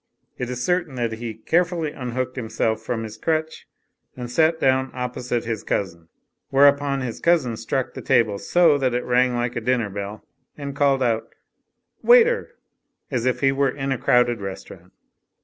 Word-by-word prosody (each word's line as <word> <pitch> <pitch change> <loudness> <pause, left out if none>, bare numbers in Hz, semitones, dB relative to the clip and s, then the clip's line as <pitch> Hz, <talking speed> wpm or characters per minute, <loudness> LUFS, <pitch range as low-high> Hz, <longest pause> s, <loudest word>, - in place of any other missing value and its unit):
It 125 - -3
is 125 0 -4
certain 175 -6 0
that 120 -2 -1
he 110 0 -5
carefully 165 - 0
unhooked 130 -1 -4
himself 110 -2 -1
from 115 0 -3
his 110 0 -8
crutch 160 +2 -2 0.5
and 120 -1 -6
sat 160 +4 +2
down 130 0 +2
opposite 125 -1 -3
his 115 -2 -3
cousin. 85 -4 -3 0.4
Whereupon 140 0 +4
his 120 -3 -5
cousin 155 -9 +2
struck 125 +3 -3
the - - -7
table 115 -6 +2
so 160 - +3
that.it 125 -2 0
rang 125 0 +2
like 120 0 -2
a 115 - -2
dinner 120 -3 0
bell 100 +2 -6 0.3
and 140 -1 -6
called 135 -2 +2
out, 115 -2 0 0.7
"Waiter 485 0 +5 0.3
!" - - -47
as 125 -2 -1
if 125 -1 0
he 135 -1 +4
were 135 0 +1
in 135 +1 -3
a 130 - -1
crowded 120 -2 +2
restaurant. 95 -2 -9
125 Hz, 165 wpm, -23 LUFS, 115-140 Hz, 0.7 s, Waiter